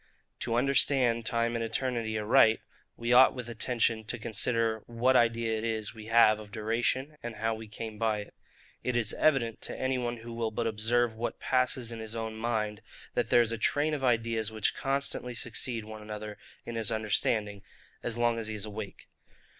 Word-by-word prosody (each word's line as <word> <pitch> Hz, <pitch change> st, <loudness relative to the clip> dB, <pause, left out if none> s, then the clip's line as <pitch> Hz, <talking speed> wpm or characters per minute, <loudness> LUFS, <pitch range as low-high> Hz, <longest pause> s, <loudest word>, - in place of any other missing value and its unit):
To 115 Hz, -, -1 dB
understand 125 Hz, -3 st, +3 dB
TIME 115 Hz, -1 st, +1 dB
and 115 Hz, -, -1 dB
ETERNITY 115 Hz, -1 st, -1 dB
aright, 110 Hz, +1 st, +4 dB, 0.4 s
we 120 Hz, +1 st, 0 dB
ought 130 Hz, +2 st, +7 dB
with 125 Hz, -2 st, -6 dB
attention 115 Hz, -1 st, 0 dB
to 120 Hz, -, -2 dB
consider 115 Hz, 0 st, 0 dB
what 120 Hz, +3 st, +2 dB
idea 115 Hz, -1 st, +3 dB
it -, -, -6 dB
is 110 Hz, -2 st, -2 dB
we 110 Hz, -1 st, -10 dB
have 115 Hz, -2 st, +5 dB
of 105 Hz, -1 st, -11 dB
DURATION, 120 Hz, +7 st, -1 dB
and 120 Hz, -1 st, -6 dB
how 115 Hz, +2 st, 0 dB
we 110 Hz, 0 st, -8 dB
came 110 Hz, 0 st, -7 dB
by 110 Hz, -2 st, +1 dB
it. 105 Hz, -, -12 dB, 0.5 s
It 125 Hz, -, -1 dB
is 115 Hz, -3 st, +1 dB
evident 125 Hz, -7 st, +2 dB
to -, -, -3 dB
any 130 Hz, 0 st, 0 dB
one 120 Hz, -1 st, -2 dB
who 115 Hz, +1 st, -9 dB
will 115 Hz, -1 st, -1 dB
but 115 Hz, +2 st, -2 dB
observe 115 Hz, +2 st, +1 dB
what 115 Hz, +2 st, -4 dB
passes 125 Hz, -1 st, +1 dB
in 115 Hz, -, -6 dB
his 110 Hz, 0 st, -5 dB
own 110 Hz, -1 st, -4 dB
mind, 110 Hz, -2 st, -2 dB, 0.3 s
that -, -, 0 dB
there 120 Hz, -, +6 dB
is 115 Hz, -1 st, +1 dB
a 115 Hz, -, -3 dB
train 150 Hz, +6 st, +2 dB
of 145 Hz, -3 st, -3 dB
ideas 115 Hz, -3 st, +1 dB
which 110 Hz, -2 st, 0 dB
constantly 135 Hz, -3 st, -2 dB
succeed 115 Hz, -1 st, -2 dB
one 110 Hz, 0 st, -9 dB
another 105 Hz, 0 st, -7 dB, 0.3 s
in 120 Hz, -, -5 dB
his 115 Hz, -3 st, -1 dB
understanding, 105 Hz, -1 st, 0 dB, 0.4 s
as 120 Hz, -1 st, -2 dB
long 120 Hz, -1 st, +2 dB
as 110 Hz, -, -4 dB
he 110 Hz, -, -4 dB
is 105 Hz, 0 st, -5 dB
awake. 105 Hz, -1 st, -8 dB
115 Hz, 195 wpm, -30 LUFS, 110-120 Hz, 0.5 s, ought